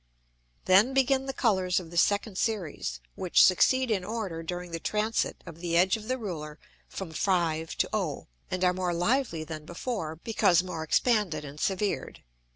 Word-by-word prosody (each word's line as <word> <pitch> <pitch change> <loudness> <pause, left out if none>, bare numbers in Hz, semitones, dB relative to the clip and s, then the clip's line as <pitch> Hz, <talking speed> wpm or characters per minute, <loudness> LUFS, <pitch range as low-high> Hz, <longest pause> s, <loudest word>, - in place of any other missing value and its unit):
Then 205 +8 +5
begin 270 0 +2
the - - -1
Colours 190 -8 +1
of 170 -3 -10
the - - -9
second 205 +3 +2
Series, 155 - -2
which 180 - +4
succeed 255 +7 +4
in 195 -4 0
order 205 -6 -4
during 175 +1 -5
the 165 - -4
transit 215 +5 -1
of 165 -2 -10
the 170 -1 0
edge 185 +4 +4
of 215 -1 -8
the 255 +1 0
Ruler 155 -9 -6 0.3
from 190 -4 -6
5 165 -2 0
to - - 0
O, - - -2 0.2
and 185 0 -2
are 180 0 +4
more 180 -1 -1
lively 180 - 0
than 155 -1 -7
before, 175 -1 -4
because 180 -1 +2
more 180 -3 -5
expanded 170 -2 +1
and 145 +1 -9
severed. 195 +3 -2
185 Hz, 170 wpm, -28 LUFS, 165-215 Hz, 0.3 s, Then